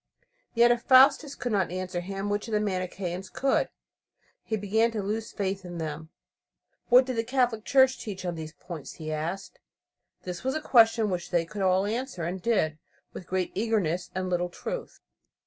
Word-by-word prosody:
Yet 235 Hz, +1 st, +6 dB
if 240 Hz, -1 st, +1 dB
Faustus 270 Hz, +3 st, +5 dB
could 245 Hz, -, -3 dB
not 200 Hz, -3 st, +1 dB
answer 185 Hz, 0 st, -3 dB
him, 195 Hz, +2 st, -4 dB
which 205 Hz, +2 st, -1 dB
of 225 Hz, -, -5 dB
the 210 Hz, -, +3 dB
Manicheans 185 Hz, -2 st, -3 dB
could? 270 Hz, 0 st, +1 dB, 0.7 s
He 220 Hz, -, -2 dB
began 215 Hz, +3 st, +2 dB
to 210 Hz, -3 st, -2 dB
lose 215 Hz, +3 st, -3 dB
faith 195 Hz, -1 st, -3 dB
in 175 Hz, -1 st, -7 dB
them. 160 Hz, 0 st, -5 dB, 0.8 s
What 250 Hz, +1 st, +7 dB
did 255 Hz, -2 st, -3 dB
the 225 Hz, -, +1 dB
Catholic 245 Hz, -3 st, 0 dB
Church 265 Hz, -1 st, +4 dB
teach 190 Hz, -4 st, -6 dB
on 175 Hz, -, -1 dB
these 160 Hz, -1 st, -7 dB
points? 170 Hz, -6 st, -8 dB
he 155 Hz, -1 st, -5 dB
asked. 170 Hz, -, -4 dB, 0.6 s
This 180 Hz, +3 st, -6 dB
was 265 Hz, +2 st, -1 dB
a -, -, 0 dB
question 225 Hz, -6 st, +4 dB
which 175 Hz, -1 st, -3 dB
they 170 Hz, -2 st, +1 dB
could 200 Hz, +4 st, -6 dB
all 190 Hz, +1 st, +3 dB
answer, 230 Hz, -3 st, -3 dB
and 180 Hz, +3 st, -3 dB
did 160 Hz, -9 st, +1 dB, 0.3 s
with 180 Hz, -, -9 dB
great 185 Hz, -1 st, -1 dB
eagerness 190 Hz, -5 st, 0 dB
and 185 Hz, 0 st, -1 dB
little 175 Hz, -1 st, 0 dB
truth. 485 Hz, -, -6 dB
195 Hz, 180 wpm, -27 LUFS, 180-230 Hz, 0.8 s, What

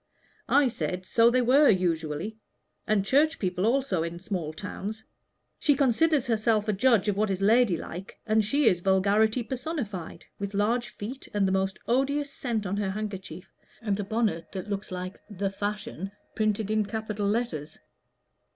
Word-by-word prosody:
I 285 Hz, -1 st, +5 dB
said, 180 Hz, -5 st, -3 dB
so 230 Hz, +3 st, +5 dB
they 250 Hz, +1 st, +2 dB
were, 275 Hz, +5 st, +6 dB
usually, 175 Hz, +2 st, 0 dB, 0.5 s
and 210 Hz, -2 st, +2 dB
Church 300 Hz, +8 st, +3 dB
people 185 Hz, +1 st, 0 dB
also 250 Hz, -8 st, +1 dB
in 170 Hz, +1 st, -3 dB
small 180 Hz, -4 st, -3 dB
towns. 205 Hz, +5 st, -6 dB, 0.6 s
She 290 Hz, -, +3 dB
considers 280 Hz, +2 st, +3 dB
herself 220 Hz, -2 st, +1 dB
a 215 Hz, -, +2 dB
judge 220 Hz, 0 st, +3 dB
of 205 Hz, -, +2 dB
what 210 Hz, +1 st, +1 dB
is 190 Hz, -1 st, -1 dB
ladylike, 195 Hz, -5 st, +1 dB
and 220 Hz, -1 st, +3 dB
she 280 Hz, +7 st, +1 dB
is 180 Hz, -6 st, +4 dB
vulgarity 205 Hz, +5 st, +3 dB
personified 245 Hz, -, -5 dB
with 200 Hz, 0 st, -4 dB
large 225 Hz, +3 st, +1 dB
feet, 230 Hz, +6 st, -7 dB
and 200 Hz, -2 st, +3 dB
the -, -, 0 dB
most 190 Hz, 0 st, 0 dB
odious 280 Hz, +4 st, +1 dB
scent 230 Hz, -5 st, -2 dB
on 195 Hz, +2 st, -2 dB
her 205 Hz, -2 st, 0 dB
handkerchief, 195 Hz, -2 st, -6 dB, 0.3 s
and 210 Hz, -3 st, -1 dB
a -, -, 0 dB
bonnet 205 Hz, -5 st, -1 dB
that 195 Hz, +1 st, -5 dB
looks 200 Hz, +1 st, -3 dB
like 185 Hz, +1 st, -5 dB
'The 200 Hz, -1 st, -2 dB
Fashion' 205 Hz, -1 st, -4 dB, 0.2 s
printed 215 Hz, -1 st, 0 dB
in 215 Hz, 0 st, +2 dB
capital 215 Hz, -1 st, -3 dB
letters." 200 Hz, -9 st, -2 dB
210 Hz, 160 wpm, -27 LUFS, 190-235 Hz, 0.6 s, were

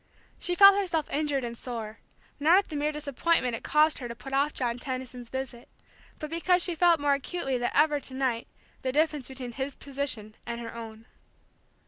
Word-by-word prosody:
She 355 Hz, -, -1 dB
herself 395 Hz, 0 st, +7 dB, 0.2 s
felt -, -, -16 dB
injured 290 Hz, -3 st, 0 dB
and 235 Hz, 0 st, -5 dB
sore, 225 Hz, -3 st, -6 dB, 0.4 s
not 320 Hz, +5 st, +6 dB
at 400 Hz, -, +2 dB
the 310 Hz, -, -5 dB
mere 295 Hz, +1 st, 0 dB
disappointment 295 Hz, -3 st, 0 dB
it -, -, -8 dB
caused 305 Hz, +1 st, +3 dB
her 245 Hz, -, -5 dB
to 235 Hz, -, -7 dB
put 270 Hz, +3 st, -9 dB
off 280 Hz, +2 st, +2 dB
John 245 Hz, -3 st, -2 dB
Tendon's 255 Hz, -2 st, -5 dB
visit, 260 Hz, -2 st, -6 dB, 0.5 s
but 305 Hz, 0 st, -6 dB
because 355 Hz, +2 st, +2 dB
she 355 Hz, -, +1 dB
felt 340 Hz, 0 st, +4 dB
more 285 Hz, 0 st, +3 dB
acutely 275 Hz, -2 st, -2 dB
than 240 Hz, -, 0 dB
ever 295 Hz, 0 st, +4 dB
to 265 Hz, -, -3 dB
night 255 Hz, -3 st, -1 dB, 0.3 s
the 260 Hz, -, -1 dB
difference 300 Hz, -2 st, +1 dB
between 260 Hz, -2 st, -7 dB
his 265 Hz, +3 st, -4 dB
position 265 Hz, -6 st, -3 dB
and 235 Hz, 0 st, -5 dB
her 230 Hz, -1 st, -7 dB
own. 225 Hz, -1 st, -9 dB
270 Hz, 190 wpm, -28 LUFS, 240-305 Hz, 0.5 s, herself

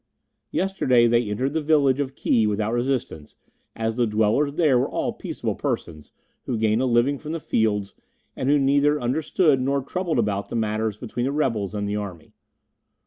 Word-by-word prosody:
"Yesterday 130 Hz, -11 st, +2 dB
they 120 Hz, -1 st, +2 dB
entered 130 Hz, +7 st, -1 dB
the 160 Hz, -, 0 dB
village 145 Hz, -3 st, +3 dB
of 135 Hz, -1 st, -3 dB
Ki 110 Hz, -5 st, +2 dB
without 105 Hz, +2 st, -1 dB
resistance, 120 Hz, -, -2 dB, 0.4 s
as 110 Hz, 0 st, -2 dB
the 120 Hz, -2 st, +2 dB
dwellers 110 Hz, +7 st, +1 dB
there 150 Hz, -7 st, +3 dB
were -, -, 0 dB
all -, -, -2 dB
peaceable -, -, -4 dB
persons, 75 Hz, -3 st, -4 dB, 0.4 s
who 120 Hz, -, -1 dB
gain 110 Hz, +1 st, +1 dB
a 130 Hz, -, +1 dB
living 125 Hz, +4 st, +2 dB
from 155 Hz, +1 st, -6 dB
the 165 Hz, -, -3 dB
fields, 105 Hz, -7 st, 0 dB, 0.4 s
and 130 Hz, -, -2 dB
who 145 Hz, -, +5 dB
neither 145 Hz, +2 st, +3 dB
understood 145 Hz, +3 st, +1 dB
nor 140 Hz, +1 st, 0 dB
troubled 175 Hz, +2 st, -2 dB
about 105 Hz, -3 st, -1 dB
the -, -, -5 dB
matters 110 Hz, -1 st, -1 dB
between 120 Hz, +2 st, -4 dB
the 135 Hz, -, 0 dB
rebels 115 Hz, -9 st, -1 dB
and 105 Hz, 0 st, -2 dB
the 105 Hz, +1 st, -2 dB
army. 90 Hz, -6 st, -7 dB
120 Hz, 180 wpm, -24 LUFS, 110-140 Hz, 0.4 s, who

